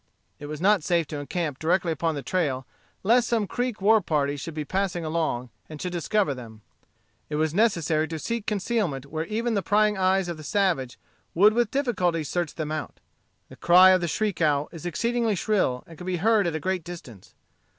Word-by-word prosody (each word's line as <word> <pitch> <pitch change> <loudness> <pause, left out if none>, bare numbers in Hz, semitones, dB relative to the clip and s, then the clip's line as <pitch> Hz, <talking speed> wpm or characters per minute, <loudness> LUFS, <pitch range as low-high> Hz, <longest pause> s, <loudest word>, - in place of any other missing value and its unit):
It 145 - -7
was 150 0 -6
not 195 -1 +3
safe 170 -1 +1
to 150 - -4
encamp 150 -1 -3
directly 170 +1 +1
upon 160 0 -1
the 140 - -5
trail, 140 -8 -1 0.4
lest 235 +4 +4
some 230 -3 +1
Creek 245 +2 -3
war 220 +1 +5
party 145 -4 0
should 150 +3 -7
be 155 -1 -3
passing 185 0 -2
along, 155 -7 -2 0.2
and 155 -1 -8
should 180 - -3
discover 175 -1 0
them. 115 -4 -11 0.7
It 150 - -3
was 155 0 0
necessary 165 -7 +2
to 160 0 -5
seek 230 +6 -4
concealment 200 - -1
where 155 +3 -4
even 230 +2 -1
the 200 - +1
prying 210 0 +2
eyes 190 0 +2
of 170 -2 -4
the 155 - -10
savage 165 -7 0 0.4
would 205 +5 +6
with 235 -1 +1
difficulty 185 - 0
search 170 +2 -3
them 155 -2 -4
out. 155 -1 -5 0.5
The - - -12
cry 180 +2 +7
of 185 -1 +3
the 175 - -1
shriek 185 +4 -1
owl 150 -2 +2
is 165 0 -7
exceedingly 230 +5 0
shrill, 185 -11 0
and 165 -2 -14
can 180 - -8
be 185 -1 -1
heard 210 +1 +3
at 165 - -2
a - - -1
great 185 +2 -2
distance. 155 - -11
175 Hz, 200 wpm, -25 LUFS, 155-205 Hz, 0.7 s, cry